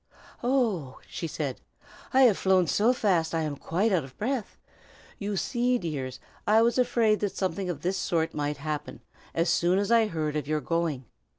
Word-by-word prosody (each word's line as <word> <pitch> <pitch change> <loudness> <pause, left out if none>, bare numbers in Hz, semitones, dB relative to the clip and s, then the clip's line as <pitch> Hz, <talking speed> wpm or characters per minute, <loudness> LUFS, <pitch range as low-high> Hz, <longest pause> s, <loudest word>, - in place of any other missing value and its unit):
"Oh!" 225 - 0
she 165 - -4
said, 145 -4 -4 0.5
"I 265 0 +5
have 235 -6 +6
flown 190 -2 +4
so 215 +8 +3
fast 180 -9 +1
I 160 - +1
am 150 -2 -2
quite 185 +10 0
out 180 -6 +2
of 130 -1 -13
breath. 245 +1 -2 0.6
You 200 -1 -2
see, 245 +4 +1
dears, 135 - -4 0.3
I 220 +2 +5
was 235 +2 +2
afraid 235 -4 +3
that 205 -2 -2
something 190 0 -1
of 155 -5 -4
this 185 +2 0
sort 165 -3 0
might 145 0 -2
happen, 150 0 -5 0.3
as 165 +1 +2
soon 175 +2 +3
as 200 +2 0
I 230 -2 +5
heard 155 -5 -2
of 150 -2 -2
your 155 0 +1
going. 160 -5 -1
180 Hz, 185 wpm, -27 LUFS, 155-220 Hz, 0.6 s, have